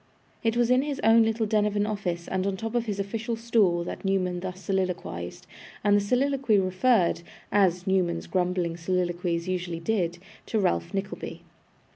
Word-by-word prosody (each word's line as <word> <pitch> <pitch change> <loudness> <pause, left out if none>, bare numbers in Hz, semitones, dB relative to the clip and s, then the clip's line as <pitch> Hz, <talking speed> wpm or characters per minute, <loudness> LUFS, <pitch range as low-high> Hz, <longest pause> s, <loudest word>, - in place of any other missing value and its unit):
It 225 0 +1
was 240 0 +3
in 255 +1 +5
his 285 -1 -3
own 225 +1 +6
little 225 0 +1
den 210 0 +2
of 210 - -3
an 205 0 +2
office 185 -5 -3
and 190 +1 -1
on 200 - 0
the - - -5
top 225 0 -3
of 240 -1 0
his 205 -2 -2
official 225 +4 -2
stool 220 -7 +2
that - - -6
Newman 185 -2 0
thus 185 0 -6
soliloquised; 180 - -3 0.4
and 205 0 +4
the 205 - +4
soliloquy 255 +1 +2
referred, 185 0 +2 0.3
as 180 -3 +3
Newman's 180 -3 +1
grumbling 180 -2 0
soliloquies 175 -1 -1
usually 180 -2 -2
did, 175 -2 0 0.3
to 225 - -1
Ralph 85 - +1
Nickleby. 195 +1 -5
195 Hz, 175 wpm, -27 LUFS, 180-225 Hz, 0.4 s, own